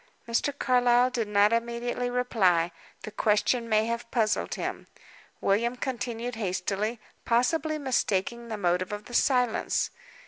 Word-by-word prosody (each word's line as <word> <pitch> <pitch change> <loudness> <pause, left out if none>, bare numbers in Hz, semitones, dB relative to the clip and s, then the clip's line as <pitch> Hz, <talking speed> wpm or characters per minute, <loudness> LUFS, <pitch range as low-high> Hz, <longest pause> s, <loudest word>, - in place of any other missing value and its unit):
Mr. 235 +5 +1
Carlyle 245 -1 +3
did 230 -4 -1
not 205 +1 +4
immediately 235 +1 -1
reply. 190 -9 +2 0.3
The 215 - -6
question 220 +3 +1
may 215 0 +3
have 235 0 -3
puzzled 220 -3 0
him. - - -5 0.5
William 235 +5 +1
continued 245 -2 -4
hastily; 205 +2 -2 0.2
possibly 305 +6 +1
mistaking 235 -4 -1
the 220 -2 -4
motive 180 -1 0
of 210 0 -5
the 245 - -11
silence. 250 -2 +1
235 Hz, 130 wpm, -27 LUFS, 210-245 Hz, 0.5 s, not